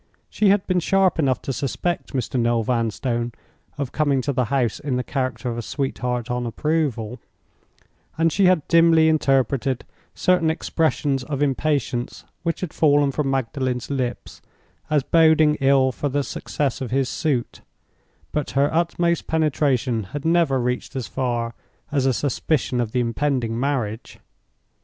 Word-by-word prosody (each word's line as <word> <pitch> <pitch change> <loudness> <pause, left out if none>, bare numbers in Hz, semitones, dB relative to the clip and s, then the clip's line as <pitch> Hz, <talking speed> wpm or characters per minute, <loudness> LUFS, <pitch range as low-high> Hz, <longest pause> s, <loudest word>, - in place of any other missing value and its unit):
She 210 - +3
had 200 0 +3
been 185 -1 +1
sharp 190 0 +2
enough 135 -5 +1
to 135 - -3
suspect 145 +8 -3
Mr. 130 -1 -1
Noel 115 -1 +2
Vanstone 120 +1 -1 0.4
of 140 -3 -3
coming 145 -3 +1
to 140 - -1
the 125 -1 +1
house 125 -2 0
in 140 -3 -2
the 125 - -1
character 130 -3 -3
of 120 -1 -2
a - - -2
sweetheart 125 -1 -3
on 125 0 -2
approval; 130 -4 -1 1.0
and 165 0 +3
she 195 - +3
had 180 -5 +2
dimly 165 -1 +5
interpreted 135 -4 +1 0.3
certain 180 -3 +2
expressions 155 -4 0
of 145 0 -1
impatience 135 -3 -1 0.2
which 165 -1 -2
had 180 -4 -4
fallen 145 -2 +3
from 140 0 -1
Magdalen's 130 -1 -2
lips 125 -3 -4 0.5
as 150 -3 +2
boding 160 -1 +4
ill 135 -1 +4
for 145 +3 -3
the 140 +1 0
success 140 -1 -3
of 130 - -3
his 135 0 +1
suit, 135 -5 -2 0.7
but 150 -2 -2
her 140 +2 +3
utmost 170 0 0
penetration 135 -7 +1
had 145 0 -5
never 165 -5 +3
reached 125 +2 -2
as 130 -3 -2
far 120 +1 -2 0.4
as 135 -2 +1
a - - +4
suspicion 130 -1 0
of 115 -2 -3
the 125 - 0
impending 120 -1 -1
marriage. 120 -5 -2
135 Hz, 150 wpm, -22 LUFS, 125-155 Hz, 1.0 s, dimly